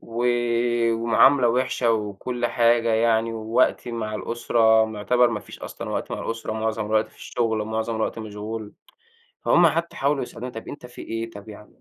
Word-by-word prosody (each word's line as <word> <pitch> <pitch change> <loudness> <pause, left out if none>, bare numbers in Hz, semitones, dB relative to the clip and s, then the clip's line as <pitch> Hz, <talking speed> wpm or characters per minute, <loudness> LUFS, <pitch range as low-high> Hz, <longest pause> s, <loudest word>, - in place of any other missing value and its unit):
و 115 +1 -4 0.7
ومعاملة 120 +3 +4
وِحشة 125 -1 +1
وكل 110 +3 -2
حاجة 115 -1 +3
يعني 115 0 +2
ووقتي 115 +2 0
مع 110 -2 -3
الأسرة 110 0 +2
معتبر 115 +3 +2
ما 105 -3 -3
فيش - - -12
أصلًا - - -7
وقت - - -3
مع - - -3
الأسرة، 115 -1 -4
معظم 110 -1 -2
الوقت 110 0 +1
في - - -25
الشُغل 115 -2 -2
ومعظم 110 +1 -2
الوقت 110 +1 -2
مشغول 105 0 -6 0.7
فهُم 175 0 +5
حتّى 165 +2 -1
حاولوا 140 +1 +1
يسألوني 125 0 -7
"طَب 115 - -8
أنت 145 -4 -8
في 120 - -11
إيه، 115 0 -4
طَب 105 0 -12
يع 105 0 -11
115 Hz, 170 wpm, -24 LUFS, 110-120 Hz, 0.7 s, فهُم